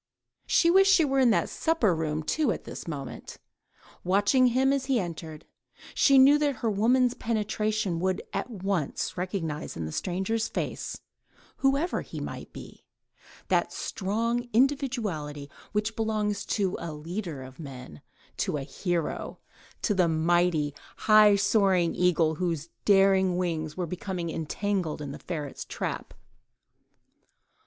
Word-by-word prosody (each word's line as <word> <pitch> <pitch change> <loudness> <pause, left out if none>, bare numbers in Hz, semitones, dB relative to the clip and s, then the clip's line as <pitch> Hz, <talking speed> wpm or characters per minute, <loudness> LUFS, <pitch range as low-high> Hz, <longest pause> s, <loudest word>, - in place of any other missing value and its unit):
She 335 - +4
wished 390 +2 +6
she 345 -5 +5
were 270 -1 +1
in 255 -2 +5
the 220 - +3
supper 320 - +1
room, 155 -1 -2
too, 290 - +1
at - - -4
this - - -8
moment, 140 -5 -7 0.7
watching 205 +8 +4
him 260 +3 +3
as 275 -1 -1
he 260 -3 +2
entered; 165 -4 -6 0.5
she 275 -2 +5
knew 275 +3 +7
that 290 -2 +1
her 225 - +2
woman's 245 +4 +3
penetration 215 -5 -1
would 185 +1 -1
at 195 +5 -2
once 195 - -2
recognise 175 -4 -4
in 80 - -3
the 80 - -5
stranger's 190 - -1
face—whoever 275 +6 -3
he - - -8
might - - -7
be—that - - -5
strong 230 +5 -2
individuality 215 - 0 0.2
which 210 +1 -1
belongs 215 -2 -1
to 195 -4 0
a 170 -1 -5
leader 160 -1 -5
of 130 +2 -12
men—to 125 - -7
a 140 - -4
hero: 175 +2 -3 0.5
to 210 - +2
the 185 -3 +3
mighty, 160 -2 +2 0.2
high 215 -1 +6
soaring 195 -4 +2
eagle, 170 -3 +2
whose 165 -1 -2 0.2
daring 195 -2 +4
wings 160 -3 -2
were 180 - -1
becoming 180 0 -4
entangled 175 +1 -2
in 145 -2 -5
the - - -8
ferret's 150 -5 -5
trap. - - -5
190 Hz, 130 wpm, -27 LUFS, 165-225 Hz, 0.7 s, knew